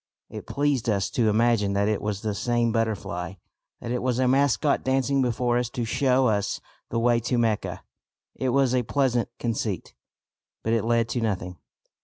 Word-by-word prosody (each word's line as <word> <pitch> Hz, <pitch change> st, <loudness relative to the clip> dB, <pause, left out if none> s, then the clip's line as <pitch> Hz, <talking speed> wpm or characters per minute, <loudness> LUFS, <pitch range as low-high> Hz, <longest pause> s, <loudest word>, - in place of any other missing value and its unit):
It -, -, -8 dB
pleased 140 Hz, -5 st, 0 dB
us 100 Hz, -3 st, 0 dB
to 115 Hz, -3 st, +2 dB
imagine 110 Hz, -2 st, +2 dB
that 100 Hz, +1 st, +1 dB
it 105 Hz, -2 st, 0 dB
was 105 Hz, -1 st, -3 dB
the 110 Hz, -2 st, -2 dB
same 120 Hz, +3 st, +1 dB
butterfly, 100 Hz, -6 st, -2 dB, 0.5 s
that 115 Hz, -, -5 dB
it 125 Hz, -, -1 dB
was 125 Hz, -1 st, 0 dB
a 130 Hz, 0 st, +2 dB
mascot 140 Hz, +2 st, +2 dB
dancing 135 Hz, +1 st, +1 dB
before 120 Hz, 0 st, +1 dB
us 125 Hz, -1 st, -2 dB
to 120 Hz, -2 st, -3 dB
show 130 Hz, +2 st, +2 dB
us 105 Hz, -4 st, 0 dB, 0.3 s
the 115 Hz, -, -2 dB
way 120 Hz, 0 st, +3 dB
to 120 Hz, +2 st, -1 dB
Mecca. 115 Hz, -3 st, -1 dB, 0.5 s
It 130 Hz, -, -2 dB
was 130 Hz, 0 st, +2 dB
a 125 Hz, -, +3 dB
pleasant 125 Hz, -2 st, 0 dB
conceit, 110 Hz, -5 st, -3 dB, 0.7 s
but 115 Hz, -, 0 dB
it 115 Hz, -1 st, +1 dB
led 115 Hz, 0 st, +2 dB
to 120 Hz, -, -1 dB
nothing. 90 Hz, -5 st, -2 dB
120 Hz, 180 wpm, -25 LUFS, 110-125 Hz, 0.7 s, way